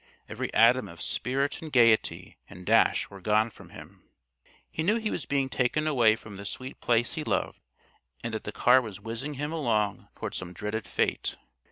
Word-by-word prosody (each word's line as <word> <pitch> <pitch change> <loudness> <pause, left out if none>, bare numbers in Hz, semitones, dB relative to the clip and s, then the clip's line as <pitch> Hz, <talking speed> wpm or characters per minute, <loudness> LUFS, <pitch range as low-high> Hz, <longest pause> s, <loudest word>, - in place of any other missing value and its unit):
Every - - -4
atom 120 +3 +5
of 85 0 -12
spirit 135 +5 -1
and 160 -2 -7
gayety 115 -4 +3
and 90 +1 -11
dash - - +3
were 100 -1 -11
gone 110 +4 +2
from - - -15
him. - - -13 0.7
He - - -3
knew 200 +7 +3
he 220 -2 -1
was 155 - -4
being 140 -1 +1
taken 130 +4 0
away 120 -8 +4
from 110 -3 -11
the 100 - -8
sweet 130 +6 -6
Place 120 0 +2
he 160 -1 -3
loved, - - -1 0.6
and 115 0 -3
that 110 - -3
the 105 - -5
car 125 +4 +5
was 105 -5 -8
whizzing 115 +7 -5
him 145 +3 -3
along 110 -11 0
toward - - -5
some 90 -1 -5
dreaded 105 +4 -4
fate. - - -1
120 Hz, 190 wpm, -28 LUFS, 105-140 Hz, 0.7 s, atom